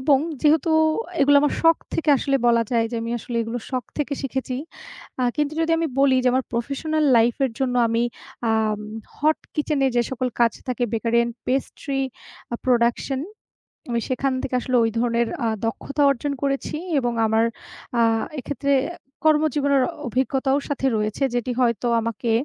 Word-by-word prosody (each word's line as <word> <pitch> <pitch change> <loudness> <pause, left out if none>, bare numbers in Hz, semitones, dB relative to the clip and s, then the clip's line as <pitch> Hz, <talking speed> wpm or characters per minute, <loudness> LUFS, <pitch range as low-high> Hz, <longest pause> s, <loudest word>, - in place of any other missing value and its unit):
এবং 275 0 +4 0.2
যেহেতু 310 +1 +3 0.5
এগুলা 285 +1 +6
আমার 295 - +2
শখ 330 0 +6 0.2
থেকে 325 - -2
আসলে 275 +1 +1
বলা 235 -1 +4
যায় 230 -1 +3
যে, 235 - -1
আমি 230 - -4
আসলে 235 +1 -5
এগুলো 230 +2 -4
শখ 255 -2 -2
থেকে 295 -1 -1
শিখেছি। 265 -1 -3 0.6
আ - - +1
কিন্তু 295 -1 0
যদি 325 0 +1
আমি 330 - +1
বলি 275 -1 +5
যে, 250 - +5
আমার 260 0 +1
প্রফেশনাল 285 +6 -1
লাইফের 240 +3 +2
জন্য 255 -2 0
আমি 230 +1 +1 0.5
আম 215 -1 +1 0.4
হট 310 +2 +2 0.2
কিচেনে 295 -2 +1
যে, 240 - +4
সকল 255 -1 -1
কাজ 230 -2 +5 0.2
থাকে 245 -1 0
bakery 230 +1 +1
and 235 0 -1
pastry 270 +1 -2 0.5
a - - -1
production 245 +2 +1 0.7
আমি 235 -1 0
সেখান 265 +1 0
থেকে 255 - -2
আসলে 255 - -1
ঐ - - +3
ধরনের 235 0 +1 0.2
আ - - +2 0.2
দক্ষতা 280 +6 -2
অর্জন 280 +2 -2
করেছি 275 +1 -1 0.2
এবং 240 -2 -1
আমার 220 +1 +3 0.5
আ - - +5 0.4
এক্ষেত্রে 280 +2 -2 0.2
অ্যা 345 - -8 0.3
কর্মজীবনের 295 -3 +3
অ - - -4 0.2
অভিজ্ঞতাও 265 +2 +1
সাথে 280 -2 -2
রয়েছে 215 +5 -1
যেটি 245 +1 -1
হয়তো 235 -1 +1
আমাকে 230 0 -2
260 Hz, 165 wpm, -23 LUFS, 235-280 Hz, 0.7 s, এগুলা